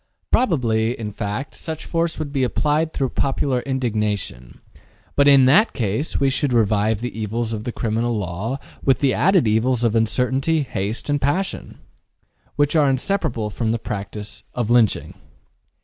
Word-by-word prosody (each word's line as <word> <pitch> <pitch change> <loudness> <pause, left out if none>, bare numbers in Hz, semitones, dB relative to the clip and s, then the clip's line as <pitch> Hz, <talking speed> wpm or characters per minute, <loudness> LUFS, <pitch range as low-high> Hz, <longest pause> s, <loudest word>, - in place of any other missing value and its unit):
Probably, 120 - +1
in 105 -2 -4
fact, 105 +6 -4
such 160 -1 -6
force 165 -1 -1
would 145 -2 -5
be 135 -2 +1
applied 150 +5 +1
through 135 -4 -1
popular 135 -1 0
indignation, 105 - -3 0.6
but 140 0 +4
in 140 -2 +7
that 200 - +5
case 110 +6 -1
we 140 - +3
should 135 0 0
revive 110 -1 +2
the 125 - -4
evils 110 +1 -2
of 110 -1 -5
the 120 - -2
criminal 115 0 -1
law 100 +7 -3 0.3
with 135 - +3
the 140 -2 +2
added 185 - +3
evils 115 +3 +1
of 115 -2 +2
uncertainty, 130 +7 +1
haste 110 -4 -4
and 145 -1 0
passion, 185 +7 -2 0.8
which 145 +2 +1
are 150 -3 +4
inseparable 130 - -1
from 110 +1 -1
the 115 - 0
practice 105 -1 -6
of 120 -2 -1
lynching. 120 -3 +2
125 Hz, 155 wpm, -21 LUFS, 110-140 Hz, 0.8 s, in